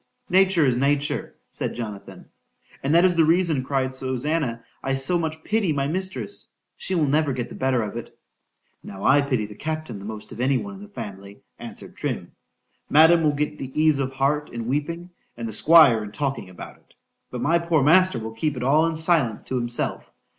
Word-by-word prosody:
——Nature 190 Hz, -3 st, +4 dB
is 130 Hz, -3 st, +2 dB
nature, 145 Hz, +3 st, -1 dB, 0.2 s
said -, -, -4 dB
Jonathan.—And 115 Hz, +6 st, -7 dB
that 170 Hz, +2 st, +6 dB
is 180 Hz, -1 st, +3 dB
the 165 Hz, -, +4 dB
reason, 165 Hz, -4 st, +2 dB
cried 130 Hz, -1 st, -1 dB
Susannah, 130 Hz, -1 st, -2 dB, 0.2 s
I 135 Hz, 0 st, -1 dB
so 135 Hz, +7 st, +2 dB
much 160 Hz, -1 st, -4 dB
pity 210 Hz, -6 st, 0 dB
my 140 Hz, -1 st, -1 dB
mistress.—She 185 Hz, -, -4 dB
will 160 Hz, -3 st, +2 dB
never 145 Hz, 0 st, +1 dB
get 125 Hz, -2 st, -4 dB
the -, -, -10 dB
better 130 Hz, -3 st, 0 dB
of 105 Hz, -, -6 dB
it.—Now 100 Hz, -3 st, -13 dB
I 140 Hz, +2 st, +5 dB
pity 130 Hz, -6 st, -1 dB
the 105 Hz, -, -10 dB
captain 155 Hz, -3 st, -5 dB
the 100 Hz, -, -10 dB
most 110 Hz, 0 st, -8 dB
of 115 Hz, -, -6 dB
any 130 Hz, +1 st, +2 dB
one 205 Hz, +6 st, -6 dB
in 195 Hz, -, -11 dB
the 205 Hz, -, -10 dB
family, 100 Hz, -, -9 dB, 0.2 s
answered -, -, -10 dB
Trim.——Madam 160 Hz, +3 st, +1 dB
will 150 Hz, -2 st, +2 dB
get 150 Hz, +1 st, -3 dB
ease 150 Hz, +2 st, +1 dB
of 135 Hz, -1 st, -2 dB
heart 145 Hz, +3 st, 0 dB
in 115 Hz, -1 st, -5 dB
weeping,—and 150 Hz, -2 st, -5 dB
the 110 Hz, -, -6 dB
Squire 140 Hz, -5 st, +6 dB
in 105 Hz, -, -8 dB
talking 135 Hz, -3 st, -3 dB
about 90 Hz, -, -10 dB
it,—but -, -, -14 dB
my 170 Hz, +3 st, +3 dB
poor 170 Hz, -4 st, +1 dB
master 185 Hz, 0 st, +5 dB
will 110 Hz, 0 st, -6 dB
keep 140 Hz, +5 st, -2 dB
it 125 Hz, -, -4 dB
all 150 Hz, +5 st, +3 dB
in 165 Hz, -, -2 dB
silence 160 Hz, -9 st, +1 dB
to 130 Hz, -, -4 dB
himself. 120 Hz, -1 st, -2 dB
140 Hz, 185 wpm, -23 LUFS, 120-160 Hz, 0.2 s, that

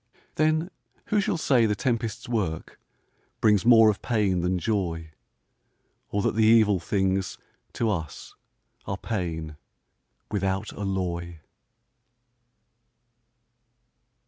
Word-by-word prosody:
Then 155 Hz, +3 st, +1 dB, 0.4 s
who 210 Hz, -1 st, +3 dB
shall 200 Hz, -3 st, -1 dB
say 125 Hz, -7 st, +3 dB
the 105 Hz, -, 0 dB
tempest's 115 Hz, -1 st, -2 dB
work 100 Hz, -10 st, -3 dB, 0.6 s
Brings 105 Hz, 0 st, +3 dB
more 115 Hz, -2 st, +7 dB
of 100 Hz, -, -8 dB
pain 105 Hz, -7 st, +1 dB
than 90 Hz, +1 st, 0 dB
joy; 85 Hz, -5 st, -2 dB, 1.0 s
Or 100 Hz, 0 st, -1 dB
that -, -, +1 dB
the 110 Hz, -, +2 dB
evil 110 Hz, -3 st, +5 dB
things, 95 Hz, +1 st, -1 dB, 0.4 s
to 115 Hz, -, -1 dB
us 80 Hz, -6 st, -5 dB, 0.5 s
Are 95 Hz, -, -2 dB
pain, 80 Hz, -8 st, -4 dB, 0.7 s
without 95 Hz, 0 st, -2 dB
alloy? 90 Hz, -4 st, -3 dB
100 Hz, 100 wpm, -26 LUFS, 90-115 Hz, 1.0 s, more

